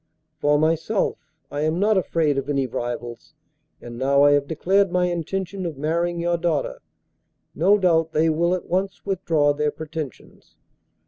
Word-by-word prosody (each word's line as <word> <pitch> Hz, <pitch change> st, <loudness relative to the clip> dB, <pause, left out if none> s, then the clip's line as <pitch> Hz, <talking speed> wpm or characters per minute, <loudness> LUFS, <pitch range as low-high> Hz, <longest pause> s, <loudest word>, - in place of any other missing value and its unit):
For 145 Hz, 0 st, +3 dB
myself 165 Hz, +6 st, 0 dB, 0.3 s
I 145 Hz, -, -3 dB
am 155 Hz, +2 st, 0 dB
not 210 Hz, +2 st, +3 dB
afraid 160 Hz, -6 st, +1 dB
of 135 Hz, +1 st, -6 dB
any 140 Hz, -2 st, +1 dB
rivals, 120 Hz, -1 st, -6 dB, 0.4 s
and, 120 Hz, 0 st, -9 dB
now 140 Hz, +2 st, +3 dB
I 145 Hz, -, +6 dB
have 145 Hz, -1 st, +2 dB
declared 190 Hz, +5 st, +1 dB
my 180 Hz, 0 st, +2 dB
intention 185 Hz, +2 st, -3 dB
of 165 Hz, -5 st, -4 dB
marrying 170 Hz, +4 st, -1 dB
your 170 Hz, 0 st, 0 dB
daughter, -, -, -1 dB, 0.7 s
no 205 Hz, +2 st, +4 dB
doubt 165 Hz, -4 st, +2 dB
they 160 Hz, +1 st, +2 dB
will 170 Hz, +3 st, +2 dB
at 185 Hz, -, -6 dB
once 190 Hz, +2 st, -2 dB
withdraw 165 Hz, -7 st, +1 dB
their 150 Hz, +1 st, 0 dB
pretensions. 155 Hz, -3 st, -8 dB
165 Hz, 155 wpm, -23 LUFS, 145-180 Hz, 0.7 s, I